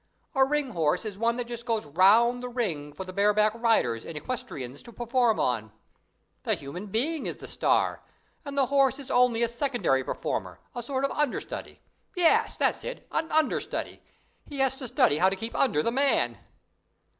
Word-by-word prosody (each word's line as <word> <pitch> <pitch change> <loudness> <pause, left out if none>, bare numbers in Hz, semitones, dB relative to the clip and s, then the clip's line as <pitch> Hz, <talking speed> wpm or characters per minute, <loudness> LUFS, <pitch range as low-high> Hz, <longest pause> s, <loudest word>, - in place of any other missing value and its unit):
A 270 -2 +4
ring 285 -1 0
horse 165 +2 0
is 210 -3 -4
one 230 +3 +1
that 245 - -2
just 235 0 -6
goes 225 -6 0
round 210 +10 +4
the 250 - -5
ring 175 - -3
for 150 +6 -7
the 185 0 -9
bareback 210 +2 +3
riders 225 - +1
and 160 - -7
equestriennes 150 - -5
to 235 - -13
perform 240 -1 +1
on. 110 -3 -1 0.7
The - - 0
human 175 +9 -8
being 275 +10 -1
is - - -4
the - - -10
"star", - - +1 0.4
and 280 -2 -7
the 275 - +4
horse 270 0 +3
in 280 -3 -8
only 245 -2 +3
a - - +3
secondary 235 - 0
performer, - - -4
a 245 - -4
sort 265 +3 -1
of - - -2
understudy; 295 -4 -3 0.3
yes, 350 -3 +3
that's - - +1
it, - - -7
an 320 - -1
understudy 315 0 0 0.5
he 290 - -7
has 270 -1 +2
to 265 -2 -6
study 150 -8 +3
how 185 - +5
to 195 - -2
keep 225 +4 -6
under 155 - +2
the 230 - +1
man." 275 +3 +2
235 Hz, 185 wpm, -27 LUFS, 190-265 Hz, 0.7 s, how